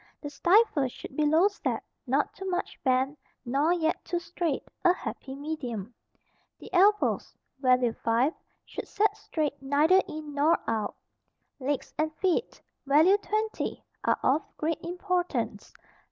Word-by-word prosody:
The 290 - -7
stifle 345 - +4
should 255 - -10
be 300 0 +2
low 320 +6 +5
set, 410 - -3 0.2
not - - +1
too 385 0 -5
much 360 - -3
bent, 265 +1 +1 0.3
nor 280 +7 +2
yet 330 -2 0
too 350 - -2
straight, 345 -2 -2 0.2
a 355 - +7
happy 270 -6 -6
medium. 250 -8 -5 0.6
The - - -13
elbows 405 +3 +3 0.2
(value 250 -3 +3
5) 235 +8 +1 0.3
should - - -7
set 420 0 +1
straight, 305 -9 -3
neither 300 +7 +4
in 305 -1 -7
nor 295 +3 +4
out. 220 -2 -1 0.6
Legs 280 +1 -2
and 310 0 +1
feet 380 +6 0 0.3
(value 315 +8 +6
20) 430 +1 -2 0.2
are - - +2
of 280 +4 +3 0.2
great 315 +1 -1
importance. 360 +1 -2
310 Hz, 140 wpm, -28 LUFS, 275-360 Hz, 0.6 s, a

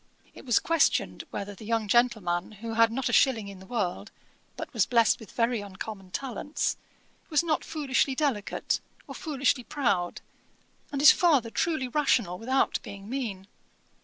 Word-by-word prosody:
It - - -13
was 240 - +4
questioned 330 -1 +1
whether 200 0 -5
the 200 - -13
young 225 0 -1
gentleman, 215 -6 +1
who 225 +2 -6
had 230 0 +4
not 265 +3 -1
a - - -1
shilling 225 -7 +3
in 195 -2 -10
the 190 - -13
world, 205 -2 -2 0.5
but - - -7
was 225 -5 +2
blest 230 -3 +3
with 220 - -12
very 235 -1 0
uncommon 195 0 -8
talents, 270 +7 -2 0.5
was 305 -1 +3
not 320 -2 0
foolishly 275 -3 0
delicate, 260 -9 -1 0.3
or - - -9
foolishly 275 -4 0
proud, 200 -11 -1 0.7
and 280 -1 -2
his 295 - +10
father 280 -10 +3
truely 310 -4 0
rational 240 - +1
without 260 +4 +1
being 200 0 -10
mean. 215 -8 -4
230 Hz, 160 wpm, -28 LUFS, 200-270 Hz, 0.7 s, his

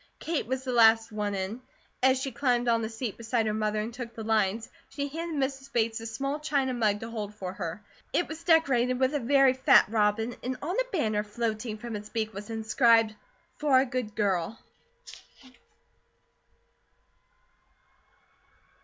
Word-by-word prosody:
Kate 320 -7 -2
was 260 +1 -2
the 260 - -3
last 225 -1 +5
one 210 -1 -2
in. 195 +6 -4 0.4
As 260 0 +4
she 270 0 -3
climbed 245 -1 +1
on 230 -1 +3
the 220 - -3
seat 225 -1 -5
beside 230 0 0
her 215 - 0
mother 215 0 0
and 220 +3 -4
took 240 -1 -7
the 225 - -6
lines, 220 0 +1 0.2
she 280 -1 -3
handed 325 +2 -4
Mrs. 270 0 -12
Bates 225 -1 0
a 225 - -6
small 275 +6 -3
china 280 -4 0
mug 215 -4 +1
to 225 - -6
hold 210 -2 -5
for 185 -3 -5
her. 185 +1 -5 0.3
It 350 - +1
was 315 +1 -8
decorated 260 -7 +3
with 260 +2 +2
a 290 - +1
very 270 +1 +4
fat 260 - +5
robin 220 +2 +1
and 255 +1 -3
on 345 +6 -3
a - - -1
banner 215 - 0
floating 215 +1 -3
from 230 0 -6
its 210 0 -7
beak 220 -1 -2
was 205 +2 -8
inscribed: 225 0 +3 0.4
"For 285 -3 +4
a 265 - +2
Good 245 -4 -4
Girl." 195 0 0
230 Hz, 170 wpm, -28 LUFS, 215-260 Hz, 0.4 s, last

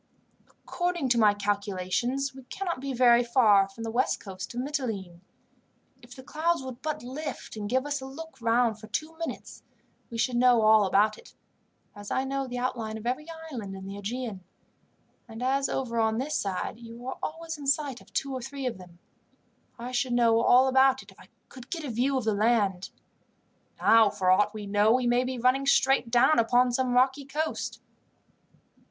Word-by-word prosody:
"According 350 -6 -3
to 240 -1 +3
my 210 -2 +5
calculation, 205 +4 -1 0.2
we 265 - -11
cannot 345 0 -4
be 275 0 -4
very 245 -1 +5
far 215 -5 +4
from 225 +4 -9
the 225 - -4
west 245 +3 0
coast 190 -2 -8
of - - -3
Mitylene. 225 - -4 0.8
If 240 0 -14
the 260 - -11
clouds 320 +2 -1
would 260 -1 -8
but 305 -3 -4
lift, 285 +3 -6
and 205 -1 -5
give 260 +3 +1
us 290 -1 -2
a 265 - -7
look 275 -1 -10
round 230 -1 +2
for 215 - -11
two 310 +10 -4
minutes, 330 - -6 0.5
we 230 - -6
should 240 +1 0
know 245 -2 +5
all 215 -1 +6
about 210 +3 +2
it, - - -17 0.6
as 205 0 -9
I 260 - 0
know 270 0 -3
the 245 0 -5
outline 235 -3 -3
of 220 - -10
every 255 +6 -2 0.2
island 205 -7 -6
in 190 0 -9
the 195 +1 -7
Aegean; 210 -1 -5 0.8
and 225 +1 -8
as 270 +1 +1
over 235 -3 -2
on 220 0 +1
this 275 +5 -3
side 195 +3 -3
you 235 +1 -11
are 260 - -5
always 325 0 -5
in 280 - -7
sight 275 -3 0
of - - -20
two 275 -1 -2
or 260 - -4
three 270 +2 -6
of 240 -6 -3
them, 175 -1 -14 0.8
I 245 +1 -6
should 250 0 -1
know 230 -1 +4
all 250 +2 +5
about 265 0 +4
it - - -16
if - - -21
I - - -16 0.2
could 255 -3 -13
get 330 -3 -4
a 280 - -4
view 260 +4 +1
of 255 - -2
the 220 -1 +1
land. 205 -3 +1 0.9
Now, 225 -2 +6
for 185 -2 +1
aught 205 +3 +3
we 215 -1 -7
know, 205 +2 +3
we 255 0 +1
may 240 +1 +3
be 255 0 -4
running 255 +3 +2
straight 270 -3 +3
down 245 +5 +4
upon 245 +2 +3
some 250 0 0
rocky 265 +3 +2
coast." 310 +3 -3
245 Hz, 195 wpm, -27 LUFS, 220-270 Hz, 0.9 s, all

